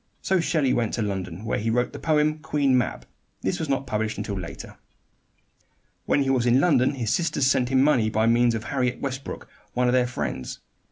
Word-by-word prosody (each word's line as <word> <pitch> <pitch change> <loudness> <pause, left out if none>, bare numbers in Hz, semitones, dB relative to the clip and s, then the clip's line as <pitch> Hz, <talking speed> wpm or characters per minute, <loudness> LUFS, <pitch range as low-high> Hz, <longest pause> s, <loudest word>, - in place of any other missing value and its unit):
So 190 -1 +2
Shelley 155 -6 +1
went 115 -2 0
to 115 - -1
London, 95 -1 -4
where - - -1
he 110 +2 -1
wrote 120 +2 0
the - - -7
poem 155 -1 +1
"Queen 145 -4 +1
Mab." 125 -3 -1 0.4
This - - -1
was 160 - -3
not 135 0 0
published 110 -2 -2
until 100 - -4
later. 90 -4 -8 1.3
When 140 - +3
he 135 - 0
was 125 -2 +1
in 120 +2 +5
London 140 -4 +3
his 115 -5 -1
sisters 160 -5 0
sent 130 -2 +2
him 130 0 +3
money 125 -7 +3
by 110 +1 +1
means 120 0 +3
of 110 - -4
Harriet 125 0 -1
Westbrook, 135 0 -5 0.3
one 125 0 +1
of 125 - +2
their 125 -1 +3
friends. 120 - -4
125 Hz, 205 wpm, -25 LUFS, 115-140 Hz, 1.3 s, in